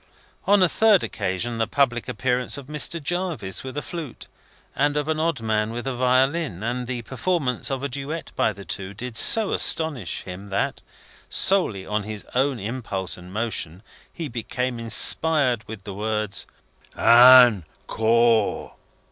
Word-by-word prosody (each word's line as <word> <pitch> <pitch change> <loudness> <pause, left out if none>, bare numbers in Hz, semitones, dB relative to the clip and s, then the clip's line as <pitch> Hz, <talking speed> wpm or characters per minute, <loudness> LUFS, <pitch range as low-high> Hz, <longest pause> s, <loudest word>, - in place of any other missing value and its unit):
On 200 -1 +5
a - - +5
third 215 0 +3
occasion, 115 +6 -3
the 115 - 0
public 125 -4 0
appearance 125 +3 -1
of 140 - -9
Mr. 150 +3 -2
Jarvis 165 - -3
with 130 +2 -8
a 145 - -3
flute, 165 -8 -8 0.5
and 145 +2 +1
of 150 0 -2
an 160 -1 -1
odd 160 -6 -1
man 110 -1 -1
with 120 +2 -6
a 135 - -2
violin, 130 - 0
and 120 +1 -3
the 120 -2 -4
performance 135 -1 -2
of 135 -1 -3
a - - 0
duet 140 +5 -5
by - - +1
the 100 -1 -12
two, 95 +3 -4
did 125 +2 -7
so 220 - +5
astonish 145 - +1
him 95 +2 -9
that, 100 - -2 0.5
solely 115 - +3
of 105 0 -2
his 105 0 -7
own 130 0 0
impulse 105 -4 -4
and 90 0 -12
motion, 100 -4 -4 0.3
he 165 -3 -6
became 125 0 -4
inspired 125 +2 +2
with 110 -3 -9
the 100 0 -7
words, 105 0 -3 0.5
"Ann 120 -4 +7 0.2
Koar!" 115 -1 +1
125 Hz, 155 wpm, -23 LUFS, 110-145 Hz, 0.5 s, Ann